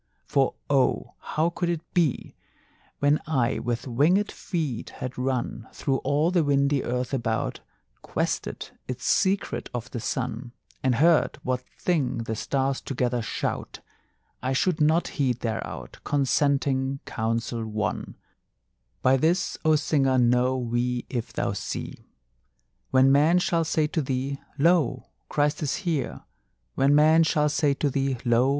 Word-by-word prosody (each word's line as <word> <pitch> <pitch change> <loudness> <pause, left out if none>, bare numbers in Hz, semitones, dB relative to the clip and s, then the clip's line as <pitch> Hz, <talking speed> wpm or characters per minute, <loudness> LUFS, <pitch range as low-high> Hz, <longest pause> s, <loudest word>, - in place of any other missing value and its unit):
For 135 -2 +1
oh, 135 -2 +1
how 160 +3 0
could 170 0 -2
it 170 -1 -4
be, 165 -7 +1 0.6
When 145 +1 +2
I 135 -5 +1
with 120 -1 -2
wingèd 155 - +2
feet 155 - -3
had 130 0 -6
run 125 -3 -2
Through 135 -2 0
all 145 +6 +1
the 175 -3 +3
windy 140 -1 +2
earth 125 +2 -2
about, 115 -4 -1 0.4
Quested - - -3 0.2
its 130 - -5
secret 195 0 +1
of 120 0 -5
the 120 - -4
sun, 125 0 -3 0.3
And 130 -2 +2
heard 160 +5 +3
what 125 0 -1 0.2
thing 145 -10 0
the 110 0 -3
stars 135 +3 -1
together 125 -2 -1
shout, 110 - -4 0.6
I 130 +1 -1
should 155 +4 +1
not 160 +3 +3
heed 130 -4 -1
thereout 110 - -5
Consenting 135 -1 +1
counsel 115 0 -2
won: 110 -1 -3 0.9
"By 130 +1 +5
this, 170 +6 +1
O 155 0 +4
Singer, 140 -3 +2
know 125 +1 +3
we 120 0 -1
if 120 -4 -3
thou - - -1
see. - - -6 0.8
When 130 +1 +5
men 150 +5 +5
shall 170 -2 +2
say 155 -1 +1
to 160 - 0
thee: 135 +1 -2 0.2
Lo! 150 -5 +3 0.3
Christ 150 +1 +1
is 150 - 0
here, 160 -6 -1 0.5
When 140 +2 +3
men 155 +2 +6
shall 150 -2 +2
say 145 -1 +2
to 145 0 0
thee: 135 -1 0
Lo! 120 +2 +4
135 Hz, 140 wpm, -26 LUFS, 125-155 Hz, 0.9 s, men